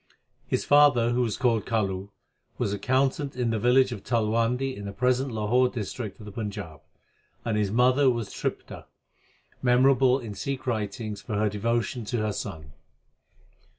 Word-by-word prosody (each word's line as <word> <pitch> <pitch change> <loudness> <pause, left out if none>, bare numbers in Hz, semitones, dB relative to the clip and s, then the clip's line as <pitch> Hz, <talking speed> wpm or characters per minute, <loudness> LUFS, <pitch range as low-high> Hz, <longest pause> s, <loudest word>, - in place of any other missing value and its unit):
F^ - - 0
father, 145 -5 +5
who 125 +1 +1
was 115 -4 -1
called 115 -4 +1
Kalu, 100 -3 -1 0.5
was 100 - -1
accountant 135 +5 0
in 125 -2 0
the 110 - -1
village 125 +3 +4
of 105 -5 -6
Talwandi 115 +3 0
in 100 - -8
the 100 - -4
prespTit 130 +4 +1
JLahor 120 +3 +2
ft. - - -17
District 110 -1 -5
of 105 - -10
the 105 - -8
Panjab, 100 -8 -6 0.6
and 110 - 0
his 105 -2 +1
mother 130 +5 +4
was 115 -4 -2
Tripta. - - -5 0.8
memorable 130 +1 +4
in 115 -6 -7
Sikh 135 +5 -4
writings 105 -3 -3
for 105 +1 -5
her_devation 110 +3 -1
to 120 - -1
her 110 -1 -1
son. 80 -4 -6
115 Hz, 155 wpm, -26 LUFS, 105-125 Hz, 0.8 s, father